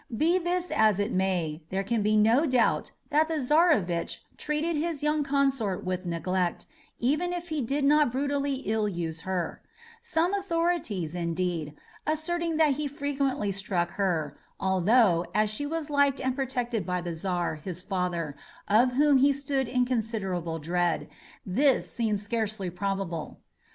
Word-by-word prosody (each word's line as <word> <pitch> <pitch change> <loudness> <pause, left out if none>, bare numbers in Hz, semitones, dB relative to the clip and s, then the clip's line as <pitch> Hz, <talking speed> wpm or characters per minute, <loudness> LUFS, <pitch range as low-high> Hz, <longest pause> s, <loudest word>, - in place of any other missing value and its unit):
Be 340 +7 +3
this 360 +1 -1
as 215 -3 +3
it 205 - 0
may, 180 -4 0
there 195 +1 -1
can 225 +2 0
be 215 +1 +2
no 230 +9 +4
doubt 255 -3 +2 0.2
that 305 +2 +4
the 325 - -2
Czarovitch 255 - +2
treated 300 +2 -1
his 305 -1 -2
youthful 300 0 +2
consort 270 -9 0
with 185 0 -3
neglect, 175 +1 -1 0.3
even 300 +8 +1
if 350 0 -5
he 310 -2 -1
did 275 +4 -1
not 295 -2 +4
brutally 280 +1 -1
ill 215 +1 +1
use 165 -4 -3
her; 185 -2 -3 0.4
some 360 -6 +1
authorities, 335 - -1
indeed, 170 -3 -2 0.3
asserting 330 +1 0
that 310 -3 +4
he 295 +2 -2
frequently 275 -6 -1
struck 185 -3 -1
her, 165 -7 -1 0.2
although, 190 -1 +3
as 215 0 +2
she 290 +7 -2
was 315 -1 -3
liked 285 -1 +3
and 260 -1 -1
protected 245 -5 -2
by 180 +1 -1
the 175 -1 -4
Czar, 175 0 -1
his 175 +3 -6
father, 180 -5 -2 0.3
of 240 +5 +4
whom 290 +1 +5
he 275 +2 +5
stood 275 -2 -1
in 250 0 +1
considerable 200 -9 -2
dread, 175 +2 0 0.4
this 260 +8 +2 0.3
scarcely 210 -2 -2
seems 175 - -14
probable. 190 -4 -3
225 Hz, 150 wpm, -28 LUFS, 180-290 Hz, 0.4 s, whom